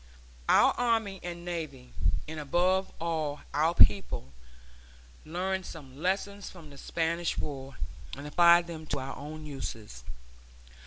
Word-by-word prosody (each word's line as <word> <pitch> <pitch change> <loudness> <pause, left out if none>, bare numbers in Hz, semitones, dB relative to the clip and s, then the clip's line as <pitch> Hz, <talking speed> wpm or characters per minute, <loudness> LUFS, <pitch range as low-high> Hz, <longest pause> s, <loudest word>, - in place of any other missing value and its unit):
Our - - +7
army 225 -5 +1
and 175 0 -6
navy, 155 -8 -5 0.3
and 155 0 -5
above 180 +6 +2
all 155 -3 -1
our 160 +3 +3
people, 100 - +4 0.9
learned 185 +4 -1
some 135 -5 -10
lessons 200 +2 -1
from 165 -5 -12
the 140 - -12
Spanish 170 +1 -1
War, 135 -2 -5 0.4
and 140 - -7
applied 170 +3 +6
them 160 -2 -7
to 145 - -1
our 135 +1 -5
own 155 +2 -7
uses. 110 - -6
160 Hz, 125 wpm, -30 LUFS, 145-175 Hz, 0.9 s, Our